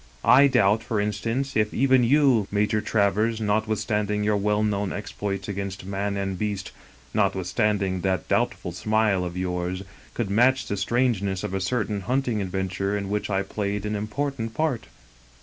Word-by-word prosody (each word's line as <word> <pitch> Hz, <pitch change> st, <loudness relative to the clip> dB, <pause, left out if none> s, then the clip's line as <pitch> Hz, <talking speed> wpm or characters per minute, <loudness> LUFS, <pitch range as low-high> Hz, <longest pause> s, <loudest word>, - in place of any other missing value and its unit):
I 140 Hz, +3 st, +7 dB
doubt, 110 Hz, -5 st, +3 dB
for 115 Hz, -2 st, -2 dB
instance, 115 Hz, +7 st, -2 dB
if 105 Hz, -1 st, +1 dB
even 130 Hz, -1 st, +4 dB
you. 130 Hz, -5 st, +4 dB
Major 105 Hz, +1 st, +1 dB
Travers, 110 Hz, +1 st, +1 dB
notwithstanding 105 Hz, -1 st, 0 dB
your 105 Hz, 0 st, +2 dB
well 105 Hz, +1 st, +1 dB
known 100 Hz, -2 st, 0 dB
exploits 105 Hz, -1 st, -4 dB
against 100 Hz, -2 st, -5 dB
man 100 Hz, +1 st, -2 dB
and 95 Hz, -2 st, -3 dB
beast, 100 Hz, -3 st, -3 dB, 0.4 s
notwithstanding 95 Hz, 0 st, 0 dB
that 95 Hz, -3 st, -1 dB
doubt -, -, +1 dB
ful 90 Hz, -, -7 dB
smile 105 Hz, +1 st, +1 dB
of 90 Hz, 0 st, -5 dB
yours, 90 Hz, 0 st, -2 dB, 0.3 s
could 110 Hz, -5 st, -2 dB
match 125 Hz, +5 st, +3 dB
the 100 Hz, -, -2 dB
strangeness 100 Hz, -3 st, 0 dB
of -, -, -4 dB
a 95 Hz, -, -1 dB
certain 105 Hz, -1 st, -1 dB
hunting 120 Hz, 0 st, 0 dB
adventure 95 Hz, +1 st, -2 dB
in 100 Hz, -1 st, -4 dB
which 105 Hz, 0 st, -1 dB
I 95 Hz, -1 st, +1 dB
played 100 Hz, -1 st, -3 dB
an 105 Hz, 0 st, -1 dB
important 115 Hz, +2 st, -3 dB
part." 155 Hz, -7 st, -1 dB
105 Hz, 160 wpm, -25 LUFS, 95-110 Hz, 0.4 s, I